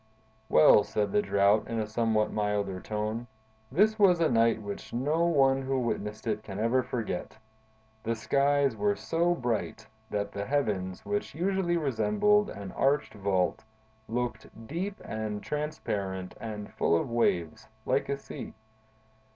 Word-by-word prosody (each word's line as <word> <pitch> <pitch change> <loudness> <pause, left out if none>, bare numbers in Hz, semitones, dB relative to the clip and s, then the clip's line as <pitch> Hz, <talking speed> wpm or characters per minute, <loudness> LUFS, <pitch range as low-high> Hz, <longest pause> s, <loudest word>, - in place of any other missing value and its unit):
"Well," 75 +6 +7
said 105 0 -1
the 210 - +3
Drought, 100 - +3
in 115 - -3
a 110 - 0
somewhat 110 0 0
milder 105 -3 -1
tone, 110 +4 -3 0.4
"this 215 - +3
was 185 -4 +5
a 160 -4 +3
night 115 -1 +3
which 105 +1 -7
no 150 +8 +1
one 135 -4 +3
who 135 0 -1
witnessed 110 -3 -3
it 110 -2 -1
can 100 -2 -8
ever 115 +4 +2
forget! 110 -6 -4 0.6
The 115 +1 -1
skies 140 +2 +2
were 105 -1 +1
so 170 +1 +1
bright 115 -4 -2 0.2
that 100 -1 -2
the 100 0 -4
heavens, 105 -10 -1
which 205 -7 -2
usually 180 0 +1
resemble 210 - +2
an 100 -2 -7
arched 140 +2 +1
vault, 95 -3 0 0.4
looked 120 -1 -3 0.2
deep 190 - -4
and 110 -1 -4
transparent 100 -12 -3
and 105 -2 -6
full - - +2
of - - -3
waves, 90 -9 0 0.2
like 130 +2 +1
a 140 - 0
sea. 140 - -8
115 Hz, 145 wpm, -29 LUFS, 105-145 Hz, 0.6 s, Well